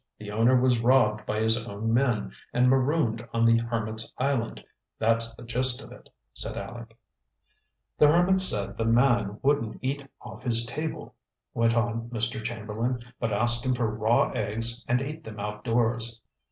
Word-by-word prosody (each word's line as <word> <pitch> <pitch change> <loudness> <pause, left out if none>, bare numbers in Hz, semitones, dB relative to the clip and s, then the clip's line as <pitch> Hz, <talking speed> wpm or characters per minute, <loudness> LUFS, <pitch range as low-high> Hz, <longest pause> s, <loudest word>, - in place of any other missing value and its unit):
The 105 -1 -8
owner 115 +4 +4
was 125 -2 +3
robbed 115 -3 +3
by 110 0 -1
his 110 +1 +1
own 110 0 -3
men 120 -4 +1 0.2
and 125 +1 +3
marooned 130 -4 +1
on 115 0 +3
the 115 0 +5
hermit's 110 -1 -3
island 130 -3 -1 0.3
that's 115 +1 +1
the 120 - -12
gist 125 +1 0
of - - -13
it," - - -14 0.2
said - - -5
Aleck. 115 -1 -8 1.0
"The 150 - +7
hermit 175 +5 +4
said 100 - +1
the 115 - -1
man 115 -3 +2
wouldn't 140 -5 +1
eat 140 +1 -3
off - - -11
his 115 -1 +3
table," 155 +6 -5 0.4
went 115 0 +2
on 115 0 -1
Mr. 115 -1 -2
Chamberlain; 115 +2 -3 0.2
"but 115 -2 -1
asked 120 +3 +1
him 130 -1 +1
for 115 -3 -1
raw 110 +2 +2
eggs 115 +3 0
and 125 +2 +1
ate 155 +3 -7
them 110 -4 -9
outdoors. 115 +2 -1
115 Hz, 165 wpm, -27 LUFS, 110-125 Hz, 1.0 s, The